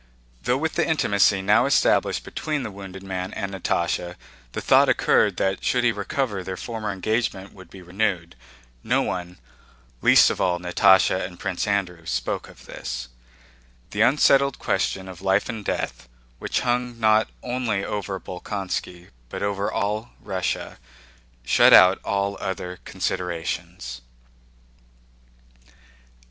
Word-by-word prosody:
Though 125 - +1
with 160 +3 -2
the 170 - +1
intimacy 105 -10 +2
now 105 +2 +4
established - - +2
between 150 -3 -3
the 110 - -5
wounded 95 -1 -9
man 95 -1 -4
and 100 0 -4
Natásha 85 -1 -1 0.4
the - - -3
thought - - +4
occurred - - +3
that 95 0 -1
should 125 -1 +1
he 120 - +4
recover 105 0 -2
their 95 0 -5
former 110 -1 -5
engagement 100 0 -2
would 95 -3 -14
be 95 -2 -12
renewed, 90 - -2 0.5
no - - +2
one—least 70 -8 0
of - - -4
all 90 -1 +2
Natásha 95 +1 +4
and 90 -1 -7
Prince 95 -1 -2
Andrew—spoke 85 -10 -2
of - - -16
this: - - -6 0.8
the 105 - -1
unsettled 140 +2 +4
question 95 -1 -1
of 95 -2 -10
life 95 +1 +2
and 115 -3 -5
death, - - -4 0.3
which - - -1
hung 125 -1 -1
not 110 0 +3
only 120 -5 -1
over 100 -2 -4
Bolkónski 90 -1 -5 0.2
but - - -5
over 100 0 -1
all 105 +3 -2
Russia, 95 -2 -3 0.7
shut - - +6
out 95 +1 +8
all 100 -2 -1
other 90 -1 -4
considerations. 80 -8 -4
95 Hz, 130 wpm, -24 LUFS, 90-110 Hz, 0.8 s, out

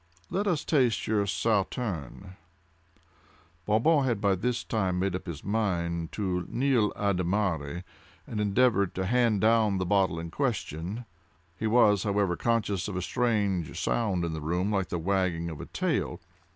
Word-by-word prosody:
Let 200 +2 0
us 170 -6 0
taste 125 -8 +2
your 105 -2 +1
Sauterne." 100 - -2 1.3
Bon 105 +1 +3
Bon 160 -3 +4
had 120 -5 0
by 100 -1 +2
this 120 +6 -1
time 95 -5 -1
made 95 0 0
up 95 - -6
his 80 -4 -6
mind 85 -6 -1
to 95 -4 -1
the 85 - -9
nil 125 -5 +2
admirari 90 -4 -1 0.4
and 105 - -3
endeavored 105 -2 +2
to 95 - -1
hand 115 -2 +2
down 110 -3 +3
the 95 - -1
bottles 95 -3 +2
in 85 0 -7
question. 110 - -3 0.5
He 110 +5 -2
was, 105 -4 +4
however, 100 -3 +1
conscious 105 -4 0
of 105 - -5
a 95 - -1
strange 100 - 0
sound 100 -7 0
in 85 - -3
the 80 - -4
room 90 +6 -1
like 95 -3 0
the 90 - -2
wagging 85 -2 0
of 75 -3 -7
a - - -8
tail. - - -1
100 Hz, 165 wpm, -28 LUFS, 90-110 Hz, 1.3 s, Bon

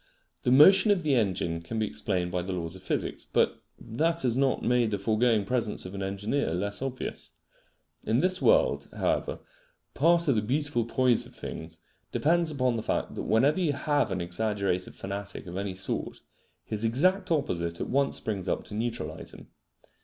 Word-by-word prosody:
The 125 - +1
motion 190 - +7
of 195 -4 +3
the 150 -2 +2
engine 95 -8 0
can 85 +7 -6
be 110 - +1
explained 90 +3 -2
by 90 -1 -1
the 95 +2 -4
laws 85 -1 -4
of 95 - -11
physics, - - -3
but - - 0 0.2
that 165 +8 0
has 120 -3 +2
not 135 0 +1
made 120 -1 +2
the 100 - -1
foregoing 110 +1 +2
presence 115 -3 0
of 90 - -7
an 100 - -5
engineer 100 +2 -1
less 100 +4 -2
obvious. 135 -1 -5 0.7
In 110 - +3
this 185 +3 +1
world, - - +3
however, - - -1 0.5
part 170 0 +3
of 140 - +4
the 110 - +1
beautiful 135 +1 0
poise 125 0 +2
of - - -18
things 80 0 -8 0.3
depends 170 +2 +2
upon 130 -5 0
the - - -2
fact - - -2
that - - -4
whenever 140 +10 +3
you 165 -5 +1
have 145 0 +1
an 95 -2 -2
exaggerated 95 0 -2
fanatic 100 0 -6
of 90 0 -8
any 100 -1 -3
sort, 95 - -4 0.4
his 110 0 -4
exact 185 - +2
opposite 85 - -1
at - - -3
once 140 +1 +1
springs 100 -4 -3
up - - -1
to - - -10
neutralise 115 +2 -4
him. - - -14
115 Hz, 185 wpm, -28 LUFS, 95-140 Hz, 0.7 s, motion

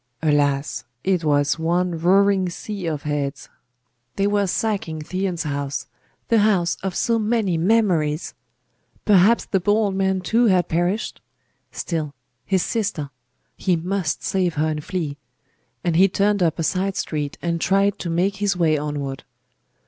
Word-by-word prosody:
Alas! 145 -2 +1 0.2
it 185 -3 +1
was 145 0 +2
one 175 +2 +1
roaring 190 +2 +3
sea 195 +1 -6
of 150 -3 -3
heads! 145 -2 -3 0.7
They 200 - +1
were 205 -1 +2
sacking 190 -5 -1
Theon's 185 0 -2
house 140 -2 -3 0.4
the 230 - +4
house 195 -5 +2
of 190 -2 -3
so 230 -1 +1
many 215 -4 +1
memories! 170 -5 +1 0.7
Perhaps 205 +3 +5
the 195 - 0
poor 205 +3 +3
old 210 -3 +1
man 190 -1 +1
too 230 +6 +2
had 180 -4 +3
perished! 175 +6 -1 0.5
Still 155 -4 -3 0.3
his 190 -3 +2
sister! 195 - -2 0.4
He 185 -3 +1
must 175 0 -2
save 180 -3 0
her 155 +1 +1
and 150 -1 -3
flee. 155 -6 -3 0.7
And 170 -2 0
he 190 +3 +6
turned 200 +1 +1
up 165 -2 +2
a 165 - -1
side 190 +3 0
street 150 -2 -3
and 170 -1 -2
tried 195 +2 +2
to 175 - -4
make 185 +4 0
his 200 -2 0
way 155 -3 +2
onward. 145 -2 -4
180 Hz, 150 wpm, -22 LUFS, 155-200 Hz, 0.7 s, he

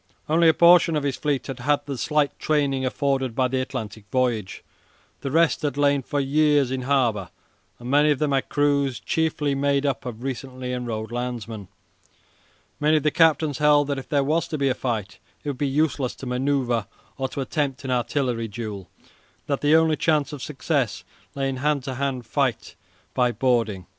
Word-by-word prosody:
Only 165 +2 +4
a - - +5
portion 170 -1 +6
of 150 - 0
his 140 -2 -1
fleet 145 -4 -1
had 135 -2 -6
had 145 +4 +1
the 140 -1 -4
slight 150 +3 0
training 140 -3 +1
afforded 135 -3 -1
by 130 0 +2
the 130 +1 -1
Atlantic 110 -5 -6
voyage. 120 -6 -1 0.6
The 135 - -4
rest 165 +3 +2
had 145 -3 -2
lain 145 -1 +3
for 145 +3 -2
years 145 -1 +2
in 130 -1 -2
harbour, 125 -7 +1 0.5
and 120 - -10
many 145 +3 +4
of 145 - +3
them 150 +1 0
had 135 -1 0
crews 140 -3 +1
chiefly 155 -3 0
made 140 0 +1
up 140 -2 -1
of 120 0 -7
recently 130 -1 -5
enrolled 115 -3 -4
landsmen. 120 -4 -5 1.1
Many 155 +1 +3
of 150 - -1
the 150 - +2
captains 155 -3 +3
held 150 -1 +5
that 140 -1 -1
if 135 - -11
there 140 -2 +2
was 155 +4 0
to 155 - -3
be 140 -1 +1
a - - +2
fight 105 -8 -4 0.2
it 145 - -3
would 135 - -5
be 145 - +1
useless 140 -2 0
to - - -9
manoeuvre 125 -4 0 0.3
or 135 - 0
to 140 - -4
attempt 140 -1 -2
an 130 - -2
artillery 125 -2 -1
duel, 105 -4 -7
and - - -29 0.4
that 140 -2 -2
the 150 +2 +4
only 160 -1 +3
chance 150 -2 +1
of 145 - -7
success 140 -4 -2 0.3
lay 135 -1 -1
in 135 -1 -3
a - - -7
hand 145 -1 0
to 130 - -4
hand 130 -2 -2
fight 125 -2 -1 0.4
by 125 -1 +2
boarding. 115 -7 0
135 Hz, 195 wpm, -24 LUFS, 125-145 Hz, 1.1 s, portion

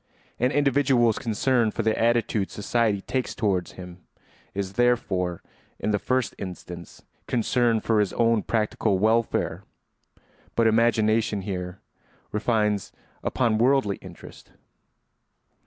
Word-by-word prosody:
An 125 - +3
individual's 135 -5 +3
concern 115 +1 +1
for 115 - -3
the 110 0 +2
attitude 115 -3 +1
society 105 -1 0
takes 130 +4 -3
toward 95 -5 0
him 90 -1 -11 0.6
is 100 -1 -3
therefore 95 -7 0 0.3
in 105 - -1
the 105 - +1
first 130 +3 0
instance 90 -2 -8 0.2
concern 120 -1 +1
for 110 -2 +1
his 105 -2 +1
own 115 -2 +2
practical 105 -3 0
welfare. 110 +3 +1 0.9
But 115 - +3
imagination 110 -2 +2
here 90 -1 -5 0.5
refines 105 -2 0 0.3
upon 115 -4 +1
worldly 125 -5 +2
interest. - - -13
110 Hz, 110 wpm, -25 LUFS, 100-120 Hz, 0.9 s, An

